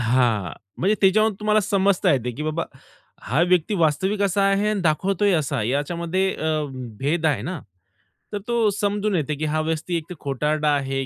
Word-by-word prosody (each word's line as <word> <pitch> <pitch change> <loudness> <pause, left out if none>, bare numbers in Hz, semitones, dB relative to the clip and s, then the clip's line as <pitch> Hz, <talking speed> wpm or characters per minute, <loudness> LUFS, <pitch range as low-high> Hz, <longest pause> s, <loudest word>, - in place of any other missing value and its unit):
हां, 115 -7 +1 0.3
म्हणजे 195 +5 +2
त्याच्यावर 215 +3 +4
तुम्हाला 210 0 +3
समजता 195 -3 +2
येते, 125 -2 0
की 145 - -6
बाबा 155 +2 -2 0.6
हा 125 +9 0
व्यक्ती 180 +2 +2
वास्तविक 190 +4 +1
असा 200 0 +1
आहे 195 +1 +2
आणि 210 -2 -1
दाखवतोय 190 +5 +1
असा 145 -3 0
आहे 105 -1 -1
याच्यामध्ये 170 +6 -1
अ, 160 - -3 0.5
भेद 160 +4 0
आहे 135 -10 +1
ना. 170 +4 -4 0.7
तर 205 - -1
तो 235 -2 +2
समजून 205 0 -1
येते, 150 -3 -1
की 155 +2 -3
हा 155 +1 0
व्यक्ती 160 +2 -2
एक 165 +2 -7
खोटारडा 150 +2 0
आहे 135 -1 -2
165 Hz, 175 wpm, -23 LUFS, 145-195 Hz, 0.7 s, त्याच्यावर